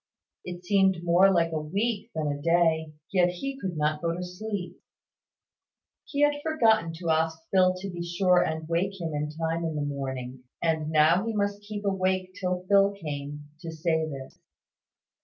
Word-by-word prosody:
It 180 0 -8
seemed 190 -3 +3
more 175 +3 +5
like 165 -3 +2
a 155 -1 -1
week 205 +8 -2
than 155 -1 -1
a 145 0 -5
day. 160 -1 +2 0.2
Yet 180 -2 +4
he 270 +10 -4
could 180 -4 -3
not 150 0 0
go 170 -1 0
to 180 - -4
sleep. 180 -1 -5 1.3
He 285 - -2
had 290 0 +3
forgotten 225 - +3
to 165 0 -2
ask 160 0 +1
Phil 185 -1 +4
to 185 +2 -6
be 175 -2 -6
sure 180 +1 +3
and 160 0 -3
wake 190 +4 -1
him 165 -2 -3
in 150 0 -2
time 165 +2 -2
in 160 -2 -2
the 145 -1 -1
morning: 130 -3 -5 0.2
and 160 -2 0
now 155 +4 +4
he 225 - -2
must 205 0 -1
keep 205 0 -6
awake 185 -1 0
till 180 -1 -3
Phil 200 0 +5
came, 145 -2 -6
to 165 -1 -6
say 160 0 0
this. 135 -2 -9
175 Hz, 175 wpm, -27 LUFS, 160-195 Hz, 1.3 s, more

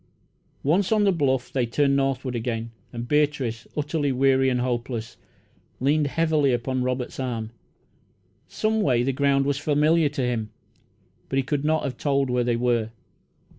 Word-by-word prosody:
Once 175 +8 +2
on 215 -1 +4
the 200 - +4
bluff 135 -7 0
they 130 - +1
turned 140 +3 +2
northward 135 -2 -1
again, 115 -1 -3 0.2
and 120 0 -6
Beatrice, 145 -6 0
utterly 150 -1 0
weary 135 0 +3
and 125 -1 0
hopeless, 120 -2 -3 0.6
leaned 145 +3 +2
heavily 155 -2 +2
upon 130 +2 -1
Robert's 125 0 -3
arm. 115 -4 -3 1.0
Some 220 0 0
way, 125 - +2
the 135 +2 0
ground 140 0 +2
was 140 -1 0
familiar 150 +1 +3
to 140 -2 -3
him, 115 -3 -1 0.8
but 135 - -1
he 135 - +2
could 140 +1 -2
not 155 +1 +1
have 135 -3 -4
told 140 -2 0
where 125 0 +1
they 120 -1 +1
were. 120 -2 +1
135 Hz, 160 wpm, -24 LUFS, 125-145 Hz, 1.0 s, on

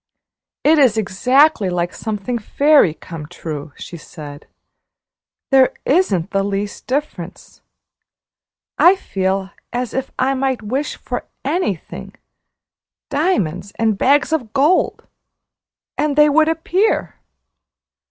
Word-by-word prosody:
"It 310 +1 +5
is 250 -6 +4
exactly 220 +3 +3
like 175 0 -2
something 220 +2 -3
fairy 280 - +3
come 165 -4 -9
true," 155 -3 -7
she 170 - -8
said; 150 -2 -11 1.0
"there 265 -1 +5
isn't 235 - +1
the 195 - +1
least 200 +1 -4
difference. 290 +4 -5 1.2
I 360 +3 +7
feel 190 - -2 0.2
as 245 -2 -3
if 265 0 -2
I 265 +1 +1
might 265 -3 -1
wish 265 +8 -2
for - - -5 0.2
anything 210 - -3 1.0
diamonds 200 - -1
and 220 -2 +1
bags 285 +8 +2
of 245 -9 -2
gold 295 +7 +2 0.9
and 300 -2 +1
they 300 0 +6
would 310 +2 +4
appear! 355 +6 0
245 Hz, 110 wpm, -19 LUFS, 190-295 Hz, 1.2 s, I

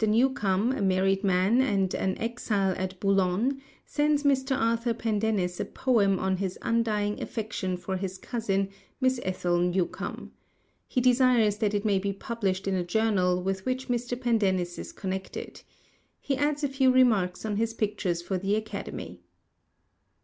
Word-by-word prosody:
Newcome, 220 -2 +2
a 265 - -2
married 195 +1 +2
man 195 +5 +3
and 195 -7 +1
an 190 -1 -1
exile 215 -4 0
at 185 0 -4
Boulogne, 195 +7 +1 0.2
sends 295 0 +1
Mr. 265 -1 +2
Arthur 230 0 +1
Pendennis 210 -5 -1
a - - -1
poem 205 -7 +2
on 190 0 0
his 190 -1 -3
undying 215 -3 0
affection 210 -5 -3
for 190 +1 -3
his 190 0 -4
cousin, 195 -3 -1 0.3
Miss 260 -1 +2
Ethel 180 -1 0
Newcome. 180 0 -2 0.6
He 250 - 0
desires 245 -4 +4
that 210 -2 0
it 205 +1 -1
may 200 -2 +3
be 200 +1 -2
published 195 -2 -2
in 195 - +1
a 185 -1 0
journal 180 -2 +1
with 190 0 -2
which 255 +2 -3
Mr. 245 0 -1
Pendennis 195 -8 +1
is - - -7
connected. 190 -1 -5 0.6
He 275 - -1
adds 290 +2 0
a - - +3
few 270 -1 +3
remarks 220 -8 +3
on 210 -2 -1
his 225 +1 -1
pictures 200 -6 -1
for 185 +1 -2
the 195 +2 0
Academy. 200 - -5
205 Hz, 155 wpm, -27 LUFS, 190-240 Hz, 0.6 s, desires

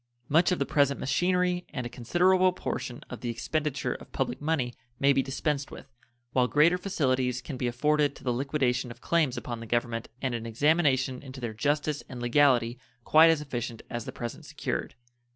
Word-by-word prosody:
Much 165 +5 +4
of 180 - +2
the 140 - 0
present 140 -1 +2
machinery 180 +4 +1
and 125 -4 -4
a - - -1
considerable 180 +10 +3
portion 125 -8 -5
of 125 - -7
the 120 - -3
expenditure 145 +5 -2
of - - -11
public 130 0 -2
money 145 -6 0 0.3
may 140 0 +5
be 135 - +3
dispensed 140 +1 -2
with, 135 - -12 0.4
while 125 0 +3
greater 150 +6 +4
facilities 130 -9 0
can 135 +2 -7
be 125 -1 -2
afforded 145 +4 +1
to - - -14
the 125 - 0
liquidation 130 -1 0
of 120 - -10
claims 155 -7 +1
upon 120 -2 -5
the 115 - -8
Government 120 0 -1
and 130 -2 -2
an 115 -1 -4
examination 135 0 +2
into 130 -1 -9
their 120 -3 -4
justice 145 +4 0
and 125 - -7
legality 120 -1 +3 0.2
quite 160 +5 +7
as 160 -2 +3
efficient 120 -5 -5
as 120 -2 -4
the - - -5
present 120 -1 -6
secured. - - -4
135 Hz, 190 wpm, -28 LUFS, 120-150 Hz, 0.4 s, quite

